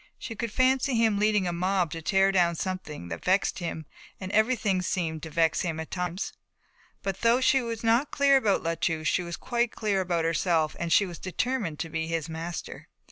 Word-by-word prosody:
She 225 - -7
could 230 0 -3
fancy 260 +2 +2
him 225 -3 +2
leading 210 -3 +2
a 175 - -1
mob 180 -1 0
to 165 - -5
tear 195 +3 +3
down 175 -3 +3
something 165 - -5
that 85 - -6
vexed 190 +2 +1
him, 165 -2 -4 0.3
and 185 -1 -6
everything 215 -4 +2
seemed 165 -3 -2
to 160 - -7
vex 165 0 +2
him, 165 -3 -2
at 160 - -6
times. 180 +1 -3 0.7
But 195 -1 -3
though 235 +2 +4
she 265 +1 +3
was 230 -2 -5
not 235 +5 +3
clear 280 -1 +4
about 215 -7 +1
La 165 0 0
Touche 160 -1 -1
she - - +2
was 170 -1 -5
quite 240 -1 -1
clear 205 -3 0
about 170 -3 0
herself 165 -1 +1
and 170 -1 -2
she 200 - +5
was 175 -3 -8
determined 205 -3 -2
to 165 - -4
be 160 0 -3
his 165 -2 -2
master. 165 +1 -6
185 Hz, 205 wpm, -27 LUFS, 165-220 Hz, 0.7 s, she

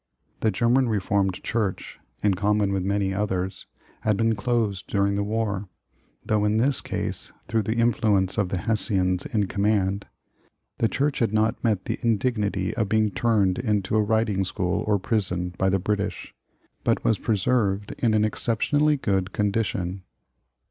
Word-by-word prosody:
The 110 - +2
German 120 +5 +2
Reformed 100 -2 0
Church, 110 -5 -2 0.2
in 105 -2 +4
common 100 +1 +1
with 95 - 0
many 100 0 0
others, 95 -2 -2 0.3
had 105 -2 0
been 115 0 +2
closed 105 -3 -1
during 100 0 +1
the 100 - 0
war, 105 -2 -2 0.6
though 105 -1 +1
in 105 +1 +2
this 130 +4 +2
case - - -4 0.2
through 115 -1 +1
the 110 +2 -2
influ 115 -3 +2
ence 95 +3 0
of 100 -3 0
the 95 - -2
Hessians 95 -2 +1
in 105 -2 0
command, 100 0 0 0.7
the 115 - +2
church 145 +1 0
had 115 -4 +1
not 110 +1 +1
met 110 -5 +1
the - - -3
indignity 105 -4 0
of 110 -4 -1
being 110 -1 +2
turned 100 -3 +1
into 105 -4 0
a 110 - +4
riding 105 -2 +1
school 90 -1 -1
or 105 -1 +2
i)rison 90 -4 -1
by 95 - +3
the 95 - +2
British, 100 +1 -3 0.5
but - - +1
was 110 - +2
preserved 105 -2 0
in 115 -3 +2
an 105 0 +3
ex 110 - -1
ceptionally 145 +6 +2
good 95 -4 -1
condition. 100 -3 -1
105 Hz, 160 wpm, -25 LUFS, 95-110 Hz, 0.7 s, in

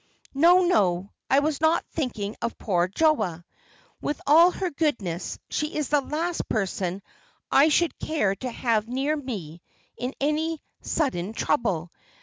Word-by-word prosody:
"No, 345 +6 +6
no, 195 - +2 0.2
I 270 - +4
was 305 0 -1
not 320 +1 +3
thinking 225 -9 -3
of 235 - -3
poor 180 -4 +1
Joa. 200 - +1 0.6
With 290 - -2
all 330 +5 +7
her 365 0 -3
goodness, 225 - -2
she 300 +1 -2
is 300 -3 -1
the 295 -1 +3
last 330 +5 -3
person 190 -2 -2 0.5
I 285 +3 +6
should 340 +2 +1
care 210 -12 0
to 255 - -4
have 225 -2 0
near 270 +5 0
me 195 - -6 0.4
in 250 +4 -4
any 310 +3 0 0.2
sudden 215 - -1
trouble. 180 - 0
265 Hz, 140 wpm, -25 LUFS, 200-310 Hz, 0.6 s, all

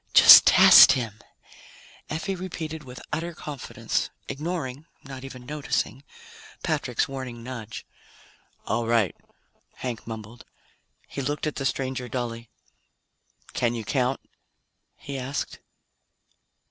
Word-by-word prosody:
"Just - - +10
test - - +9
him," 115 -5 -4 0.9
Effie 165 +6 -3
repeated 165 -4 -6
with 125 -2 -10
utter 165 +2 -3
confidence, 145 -5 -4 0.2
ignoring 150 -2 -5 0.2
not 135 -1 -9
even 130 -2 -10
noticing 145 -2 -3 0.6
Patrick's 145 -7 -1
warning 130 -4 -7
nudge. 120 -4 -8 0.8
"All 115 +1 -1
right," 115 -7 +2 0.6
Hank 120 -4 -6
mumbled. 110 +1 -8 0.6
He 140 - -5
looked 145 +3 -2
at 155 - -3
the 135 - 0
stranger 130 -2 -3
dully. 115 -2 -5 1.0
"Can 120 0 0
you 115 -2 -5
count?" 130 +2 0 0.8
he 140 -1 -7
asked. 135 +2 -4
130 Hz, 110 wpm, -25 LUFS, 120-150 Hz, 1.0 s, Just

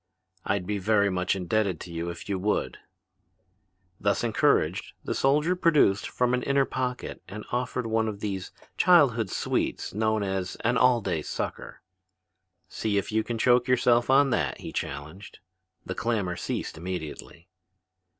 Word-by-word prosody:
"I'd 95 -2 0
be 105 +1 -2
very 100 0 +2
much 90 0 0
indebted 95 -1 0
to 90 - -8
you 85 +1 -3
if 85 0 -8
you 100 -2 -1
would." 105 +3 -1 1.2
Thus - - +1
encouraged, - - +1
the - - -2
soldier 150 +6 +2
produced 150 - +3
from 125 0 0
an 125 - +1
inner 140 0 +2
pocket 125 -1 -4
and 105 +3 -8
offered 125 0 -2
one 110 0 +1
of 105 -2 -4
those 100 -3 -4 0.3
childhood 130 - +4
sweets - - -2
known 110 0 +1
as 95 -1 -2
an 125 +2 +1
"all 125 0 +4
day 80 -6 -1
sucker." - - -5 0.8
"See 100 +2 -2
if 100 - -1
you 110 0 +1
can 120 0 -4
choke 125 +2 +3
yourself 120 -1 +3
on 135 0 +5
that," - - -1
he - - -7
challenged. 75 +8 -6 0.5
The 95 - -3
clamor 100 -4 -1
ceased - - -4
immediately. 85 -1 -7
110 Hz, 150 wpm, -27 LUFS, 95-125 Hz, 1.2 s, on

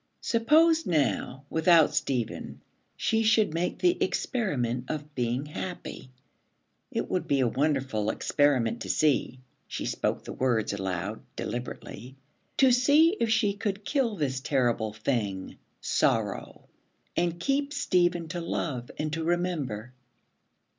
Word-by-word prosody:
Suppose, 315 +8 +4
now, 135 - 0
without 160 0 +4
Stephen 135 -6 -2 0.4
she 225 0 +1
should 220 -5 +3
make 170 +2 -1
the 360 0 +2
experiment 130 - -1
of 150 -1 -5
being 125 +1 -1
happy. 170 -3 -6 0.8
It - - -2
would 180 -2 -2
be 140 -3 +2
a 125 - +3
wonderful 130 -5 0
experiment 120 -6 +1
to 95 - -5
see, 130 +3 +1 0.3
she - - -4
spoke - - -1
the - - -7
words 120 -5 0
aloud, 95 +1 -3
deliberately, 125 0 -6 0.4
to 265 -2 +6
see 290 +8 +5
if 230 - +1
she 215 -2 +2
could 205 0 -3
kill 260 -7 +1
this 135 -6 -1
terrible 120 -5 0
thing, 105 -4 -2 0.2
Sorrow, - - 0 0.5
and 170 0 0
keep 280 +7 0
Stephen 175 - +1
to 175 +1 -4
love 135 -7 -3
and 155 0 -2
to 160 0 -2
remember. 155 -10 -2
150 Hz, 125 wpm, -28 LUFS, 125-200 Hz, 0.8 s, to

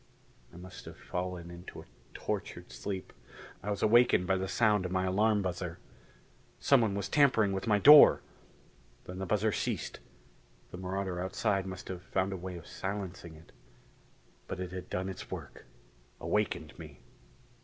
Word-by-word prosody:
I 85 - -14
must 90 0 -11
have - - -10
fallen 90 -1 -5
into 85 +1 -10
a - - -11 0.3
tortured - - -4
sleep, 95 -2 -5 0.5
I 100 - -5
was 100 - -2
awakened 115 -4 +5
by 95 +1 +2
the 95 0 -2
sound 105 -2 +2
of 90 - -4
my 95 0 0
alarm 105 +2 +2
buzzer. 90 -1 -4 0.8
Someone 115 -7 +3
was 100 - -2
tampering 125 -8 +4
with 95 +4 -3
my 105 -2 +4
door! 150 +7 +9 0.8
Then 90 +1 -8
the 95 - -4
buzzer 105 +3 +1
ceased; - - -3 0.7
the - - -7
marauder 95 -1 -3
outside 95 +1 -1
must 95 0 -7
have 90 -1 -6
found 95 +1 -1
a - - -4
way 90 0 -6
of 85 - -11
silencing 95 -4 -6
it. 80 +1 -17 1.0
But - - -5
it 90 -1 -5
had 90 -1 -7
done 95 +1 -2
its 95 - -7
work - - -8 0.5
awakened - - -2
me. - - -11
95 Hz, 160 wpm, -31 LUFS, 90-105 Hz, 1.0 s, door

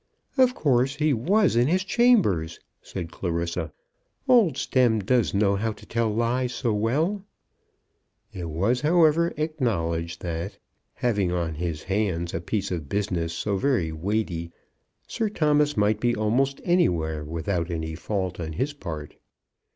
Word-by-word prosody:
"Of 255 -2 +4
course 135 -1 +2
he 150 0 +2
was 185 - +2
in 120 +2 +4
his 185 +4 +2
chambers," 185 - +2 0.2
said 85 -3 -6
Clarissa. 85 -2 -3 0.6
"Old 220 - +5
Stemm 125 -5 +2
does 115 +2 +1
know 100 0 +3
how 110 +2 -1
to - - -15
tell 115 -1 0
lies 120 +3 0
so 120 -5 0
well!" 150 - 0 1.1
It 85 -3 -5
was, 100 +11 0
however, 165 +1 +4
acknowledged 90 - -2
that, 85 +3 -4 0.4
having 100 -7 0
on 85 -2 -1
his 80 -1 -4
hands 95 -4 -1
a 85 - -2
piece 100 +2 -2
of 80 -6 -4
business 90 -5 -1
so 100 +4 -2
very 105 - +1
weighty, 85 -1 -2 0.5
Sir 220 -2 -2
Thomas 150 - +2
might 105 +1 +2
be 120 0 +1
almost 125 +6 0
anywhere 85 - +1
without 85 +3 -2
any 80 -2 -3
fault 95 +1 -3
on 80 -2 -4
his 135 - -2
part. 80 - -7
105 Hz, 145 wpm, -25 LUFS, 85-140 Hz, 1.1 s, Old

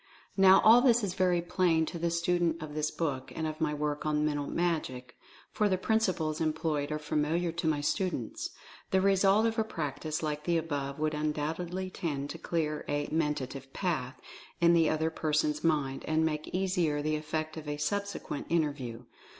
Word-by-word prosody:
Now, 195 -1 +7
all 230 +3 +8
this 240 -3 +4
is 190 -3 -1
very 180 -2 +2
plain 175 -2 +2
to 170 - -6
the 170 +1 0
student 170 0 +1
of 155 -1 -7
this 150 0 0
book, 140 -7 -3
and 160 - -2
of 155 +1 -4
my 155 -1 +2
work 150 0 -2
on 150 0 +1
"Mental 145 -2 -1
Magic," 155 -8 -2 0.4
for 210 -1 +1
the 185 - +2
principles 185 -7 0
employed 155 -2 -1
are 150 - 0
familiar 155 +3 0
to 170 0 -3
my 150 -2 +1
students. 155 - -2 0.4
The 190 - +3
result 195 +2 +4
of 225 0 0
a - - +3
practice 155 -4 -4
like 150 -1 -3
the 170 -1 +2
above 140 -4 -3
would 155 0 0
undoubtedly 160 +5 -2
tend 145 -6 -3
to - - -8
clear 155 -3 -2
a 145 0 -1
"mentative 140 -4 -2
path" 155 -9 -2 0.4
in 170 0 +5
the 165 -2 +4
other 160 +1 0
person's 150 -1 0
mind, 145 -5 0
and 160 0 +2
make 155 -1 -2
easier 180 -6 0
the 155 0 0
effect 155 +1 -3
of 155 -2 -8
a 145 0 -2
subsequent 200 -1 -3
in 170 -1 +3
terview. 125 -5 -5
155 Hz, 185 wpm, -30 LUFS, 150-175 Hz, 0.4 s, all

